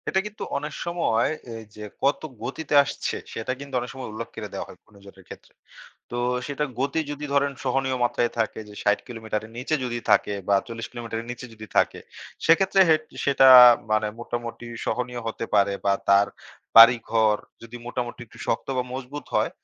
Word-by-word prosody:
এটা 190 - +2
কিন্তু 210 +1 -8
অনেক 150 +1 -5
সময় 170 -9 +1 0.3
এইযে 110 -1 -11 0.2
কত 140 +2 +2 0.2
গতিতে 140 +6 -4
আসছে - - -4 0.2
সেটা 115 +3 -3
কিন্তু 140 -1 -10
অনেক 120 0 -6
সময় 130 -3 -7
উল্লেখ 115 +1 -5
করে 105 -3 -8
দেওয়া - - -4
হয় - - -13
অন্যজনের 100 -2 -17
ক্ষেত্রে। - - -13 0.6
তো 120 - -4 0.3
সেটার 145 0 -2
গতি 140 +4 0
যদি 145 0 -5
ধরেন 140 0 +2
সহনীয় 130 0 0
মাত্রায় 120 0 +1
থাকে 110 -1 -1
যে 105 - -12
৬০ 105 0 +2
কিলোমিটারের 110 -2 -5
নিচে 130 +5 -1
যদি 120 -1 -3
থাকে 105 - +3
বা, 100 - +4
৪০ 115 -1 -6
কিলোমিটারের 115 -1 -5
নিচে 125 +1 -7
যদি 110 0 -10
থাকে। - - +2 0.5
সেক্ষেত্রে 190 +4 +4
হে 160 - +6 0.3
সেটা 135 -1 +5 0.4
মানে 110 0 +2
মোটামুটি 120 0 -5 0.2
সহনীয় 125 -1 -2
হতে 115 0 -3
পারে। 100 -1 +4
বা, 100 - +3 0.2
তার 100 +1 +5 0.5
বাড়িঘর 115 -2 +7 0.3
যদি 115 +1 -9
মোটামুটি 120 0 -4
একটু - - -17
শক্ত - - -1
বা, 125 - +1
মজবুত 130 +3 -6
হয়, - - +2
120 Hz, 170 wpm, -24 LUFS, 110-135 Hz, 0.6 s, বাড়িঘর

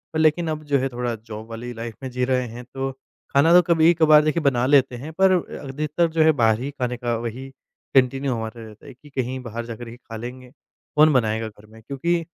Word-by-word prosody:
अ, - - +2
लेकिन 160 +2 +3
अब 155 0 -3
जो 140 - +6
है 135 +1 -1
थोड़ा 120 -1 -3
जॉब 110 0 -10
वाली 120 +2 -6
लाइफ़ 115 -1 -7
में 130 - -4
जी 125 0 0
रहे 125 -1 0
हैं 120 +2 -9
तो 135 0 -2 0.4
खाना 145 +4 +4
तो 180 - +8
कभी-कभार 160 -2 +6
देखिए 155 +2 0
बना 125 -3 +2
लेते 135 -2 +4
हैं। 140 +6 -7
पर 190 -1 +6 0.3
अधिकतर 150 +5 -1
जो 160 0 +1
है 160 - +6
बाहर 110 0 +4
ही 140 +3 -4
खाने 125 -3 -3
का 120 -1 -1
वही 120 +4 -6 0.5
कंटिन्यू 135 +1 +3
हमारा 115 0 -5
रहता 110 -1 -14
है - - -10
कि 145 +4 -18
कहीं 130 -1 -3
बाहर 115 0 -5
जाकर 115 0 -8
ही 115 - -9
खा 115 -2 -11
लेंगे। 125 +2 -8 0.5
कौन 155 +1 +6
बनाएगा 110 -3 +1
घर 105 0 -15
में 110 +1 -16
क्योंकि 165 +7 -1
125 Hz, 225 wpm, -23 LUFS, 115-150 Hz, 0.5 s, तो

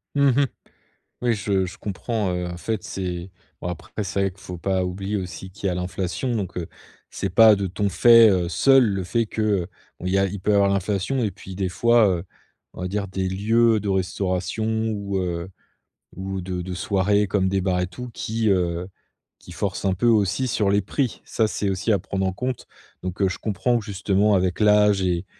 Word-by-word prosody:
Mmh 140 -1 +4
mh. 135 +2 +3 0.8
Oui 120 -1 +2
je 100 -3 0
je 95 +4 -8
comprends, 105 0 -2
heu, 90 0 -2
en 90 - -5
fait 110 +4 -3
c'est 90 -1 -4 0.3
bon - - -4
après 90 +4 -5
c'est 100 +1 -1
vrai 95 -1 +1
qu'il 95 - -21
faut 90 -2 -8
pas 95 +1 0
oublier 95 +3 -3
aussi 95 0 -6
qu'il 100 +1 -4
y - - +2
a 90 - -1
l'inflation 90 +6 -2
donc, 100 -5 -3
heu, 85 -2 -3 0.4
c'est - - -3
pas 110 +3 +7
de 100 -1 -2
ton 100 +3 -1
fait, 115 +4 +7
heu, 90 -3 +1
seul 135 +8 +5
le 100 -3 -1
fait 115 +5 0
qu'il 105 -5 0 0.4
y 95 +1 +1
a 95 - +3
il 100 +1 -4
peut 105 +3 +1
avoir 100 -1 +4
l'inflation 100 +6 0
et 105 -4 0
puis 95 - -10
des 95 0 -1
fois, 115 +5 +4
heu, 90 -3 0 0.5
on - - -9
va 90 - -1
dire 100 0 -3
des 95 0 -2
lieux 110 +3 +2
de 105 - -3
restauration 95 +1 -1 0.3
ou, 100 -2 -3
heu, 90 -1 -3 0.7
ou 95 0 -4
de 90 -1 -4
de 90 0 -5
soirée 100 +2 +1
comme 95 -1 +1
des 95 0 0
bars 90 -1 0
et 90 - 0
tout 125 +8 -8
qui, 110 0 -1
heu, 90 -2 +1 0.5
qui - - -14
forcent 90 +4 -3
un 95 - +2
peu 95 +6 -1
aussi 110 +2 +2
sur 105 -3 +1
les 100 +1 +3
prix. 125 +5 -2
Ça 110 -2 0
c'est 100 +1 -1
aussi 95 +4 -1
à 100 - +3
prendre 95 0 -3
en 95 - 0
compte, 125 +5 -4 0.4
donc, 90 +1 -5
heu, - - +5
je 95 - -4
comprends 115 +4 0
justement 100 0 +1
avec 90 0 0
l'âge 105 -2 +4
et 90 0 0
95 Hz, 210 wpm, -23 LUFS, 90-105 Hz, 0.8 s, pas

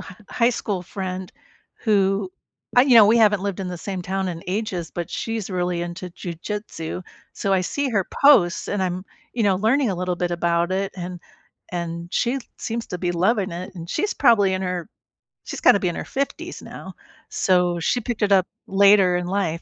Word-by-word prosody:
h 180 -1 -11
high 235 0 +2
school 200 -6 -3
friend 185 0 -5 0.5
who 195 -2 +2 0.5
I 245 - +9
you 265 -2 +4
know, 220 -3 +9
we 225 +2 +5
haven't 210 -3 +4
lived 200 -1 -3
in 185 - -3
the 180 -2 -5
same 190 0 -4
town 190 +1 -2
in 170 -1 -5
ages, 185 -3 -3
but 175 -1 -4
she's 225 -3 -3
really 180 -2 -1
into 175 +1 -6
Jiu 170 0 -6
Jitsu, 180 -2 -5 0.3
so 195 - -1
I 185 - +3
see 285 +9 -1
her 200 -5 +1 0.2
posts, 190 -12 +5
and 205 -2 -1
I'm, 185 0 -2 0.3
you 235 - -1
know, 195 -2 +3
learning 235 +6 +2
a - - -1
little 180 0 -2
bit 175 0 -1
about 170 0 +1
it, 195 +1 -1
and 180 0 -6 0.5
and 170 0 -4
she 250 +3 +1 0.2
seems 230 0 -4
to 180 - -4
be 175 0 -1
loving 190 +3 +1
it, 180 +3 -7
and 170 -1 -8
she's 415 - -1
probably 215 -8 +4
in 185 - -2
her 180 0 -3 0.6
she's - - -7
gotta 200 - +6
be 185 - 0
in 170 - -4
her - - -5
50s 275 +1 -4
now, - - -9 0.4
so 180 -2 +2
she 205 +9 +1
picked 240 -1 -4
it 205 - +2
up 190 -2 +5 0.2
later 195 -2 +5
in 180 0 -3
life. 180 -4 -1
190 Hz, 200 wpm, -23 LUFS, 175-210 Hz, 0.6 s, I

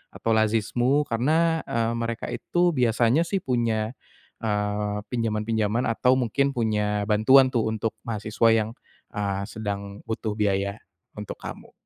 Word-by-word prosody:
atau 115 - -1
Lazismu 115 +5 +2
karena, 160 +7 +1
eee, 115 0 0
mereka 115 0 -3
itu 175 0 +1
biasanya 125 +3 +2
sih 195 0 -2
punya, 115 -3 0 0.5
eee, 105 -1 -1
pinjaman-pinjaman 110 0 0
atau 125 +3 +3
mungkin 135 +3 0
punya 105 -3 0
bantuan 120 +6 +5
tuh 115 -3 +1
untuk 110 0 -1 0.2
mahasiswa 110 +1 +1
yang, 110 -1 +1 0.4
eee, 100 -1 -2
sedang 100 -2 -5
butuh 110 -1 -2
biaya 100 0 0 0.4
untuk 105 -1 -6
kamu. - - -9
110 Hz, 125 wpm, -25 LUFS, 105-125 Hz, 0.5 s, bantuan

